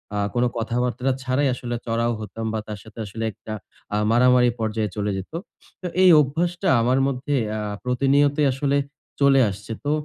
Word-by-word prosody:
আ -, -, -1 dB, 0.2 s
কোন 120 Hz, -, +2 dB
কথাবার্তা 125 Hz, +3 st, -1 dB
ছাড়াই 135 Hz, +2 st, +1 dB
আসলে 120 Hz, -1 st, -4 dB
চড়াও 115 Hz, +1 st, 0 dB
হতাম 110 Hz, +1 st, -6 dB
বা 110 Hz, -, -1 dB
তার 105 Hz, -2 st, -6 dB
সাথে 110 Hz, 0 st, -13 dB
আসলে 110 Hz, +3 st, -6 dB
একটা 110 Hz, -, -9 dB, 0.4 s
আ -, -, +2 dB
মারামারি 125 Hz, 0 st, +5 dB
পর্যায়ে 110 Hz, -1 st, -1 dB
চলে 105 Hz, -1 st, -1 dB
যেতো। 100 Hz, -, -6 dB, 0.4 s
তো 180 Hz, -, -3 dB, 0.2 s
এই 185 Hz, -, +8 dB
অভ্যাসটা 175 Hz, +6 st, -1 dB
আমার 125 Hz, +3 st, +2 dB
মধ্যে 140 Hz, +2 st, -2 dB, 0.2 s
আ -, -, -3 dB, 0.2 s
প্রতিনিয়তই 140 Hz, +3 st, +2 dB
আসলে 140 Hz, +2 st, 0 dB, 0.4 s
চলে 140 Hz, -1 st, +5 dB
আসছে। 100 Hz, +3 st, -8 dB
তো 145 Hz, -, +1 dB
125 Hz, 165 wpm, -23 LUFS, 115-140 Hz, 0.4 s, এই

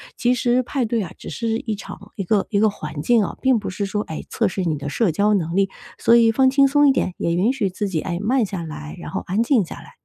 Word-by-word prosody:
其 245 Hz, +1 st, +2 dB
实 245 Hz, +1 st, +1 dB
派 255 Hz, 0 st, -1 dB
对 230 Hz, 0 st, 0 dB
啊， 185 Hz, -, -5 dB
只 -, -, -9 dB
是 225 Hz, -1 st, -2 dB
一 220 Hz, -2 st, -3 dB
场 200 Hz, 0 st, -10 dB
一 195 Hz, -, -3 dB
个 200 Hz, +2 st, +1 dB
一 200 Hz, -, +1 dB
个 215 Hz, +1 st, +4 dB
环 155 Hz, -6 st, -6 dB
境 235 Hz, +4 st, +3 dB
啊， -, -, -6 dB
并 260 Hz, -3 st, +3 dB
不 205 Hz, -, -5 dB
是 200 Hz, +2 st, -3 dB
说， 205 Hz, +1 st, -2 dB
哎， 160 Hz, -, -6 dB
测 225 Hz, -, +1 dB
试 190 Hz, 0 st, -3 dB
你 160 Hz, -4 st, -1 dB
的 145 Hz, 0 st, -6 dB
社 205 Hz, +4 st, +1 dB
交 205 Hz, +6 st, +2 dB
能 170 Hz, -4 st, -1 dB
力， 195 Hz, 0 st, +2 dB, 0.3 s
所 230 Hz, -, +4 dB
以 230 Hz, -1 st, +5 dB
放 260 Hz, +3 st, +4 dB
轻 275 Hz, +1 st, +4 dB
松 290 Hz, +1 st, +4 dB
一 -, -, +6 dB
点， 185 Hz, -, -1 dB
也 170 Hz, -, -1 dB
允 195 Hz, +8 st, +2 dB
许 255 Hz, -8 st, -1 dB
自 200 Hz, +2 st, -3 dB
己， 170 Hz, -4 st, -1 dB
哎， 175 Hz, -2 st, -3 dB
慢 240 Hz, +3 st, +2 dB
下 190 Hz, -3 st, -5 dB
来， 155 Hz, -1 st, -7 dB
然 -, -, -8 dB
后 190 Hz, -, -2 dB
安 200 Hz, +5 st, +1 dB
静 235 Hz, -5 st, +2 dB
下 -, -, -8 dB
来。 -, -, -13 dB
210 Hz, 305 characters per minute, -21 LUFS, 185-235 Hz, 0.3 s, 一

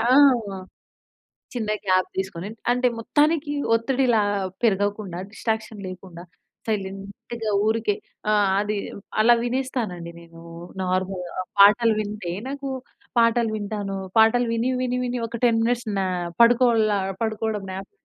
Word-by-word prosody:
ఆ! -, -, +1 dB, 1.5 s
చిన్న 220 Hz, -4 st, -2 dB
గ్యాప్ 185 Hz, -1 st, +3 dB
తీసుకొని, 190 Hz, 0 st, -3 dB, 0.2 s
అంటే 250 Hz, +1 st, +2 dB
మొత్తానికి 295 Hz, +4 st, +1 dB, 0.2 s
ఒత్తిడిలా 240 Hz, -1 st, +2 dB, 0.4 s
పెరగకుండా, 205 Hz, -3 st, 0 dB
డిస్ట్రాక్షన్ 220 Hz, -2 st, -3 dB
లేకుండా, 180 Hz, -2 st, -9 dB, 0.4 s
సైలెంట్‌‌గా 200 Hz, +2 st, -4 dB
ఊరికే 220 Hz, -1 st, +1 dB, 0.4 s
ఆహ్, 205 Hz, -2 st, +3 dB
అది 210 Hz, 0 st, -2 dB, 0.4 s
అలా 240 Hz, +2 st, +6 dB
వినేస్తానండి 240 Hz, -9 st, -3 dB
నేను. 165 Hz, 0 st, -15 dB, 0.4 s
నార్మల్‌గా 185 Hz, -1 st, -2 dB, 0.2 s
పాటలు 215 Hz, +3 st, +6 dB
వింటే, 205 Hz, -4 st, -4 dB, 0.2 s
నాకు 275 Hz, 0 st, -5 dB, 0.5 s
పాటలు 230 Hz, -1 st, +3 dB
వింటాను. 205 Hz, -1 st, -4 dB, 0.2 s
పాటలు 235 Hz, +2 st, +5 dB
విని, 230 Hz, +3 st, 0 dB
విని, 250 Hz, 0 st, -1 dB
విని 245 Hz, 0 st, -2 dB
ఒక, 230 Hz, -, -7 dB
10 230 Hz, -2 st, +3 dB
మినిట్స్ 240 Hz, 0 st, 0 dB
నాప్ 180 Hz, -2 st, -2 dB
పడుకోలాప్ 220 Hz, -5 st, +3 dB
పడుకోవడం 220 Hz, -2 st, -2 dB
నాప్. 195 Hz, -, -7 dB
215 Hz, 115 wpm, -24 LUFS, 195-235 Hz, 1.5 s, అలా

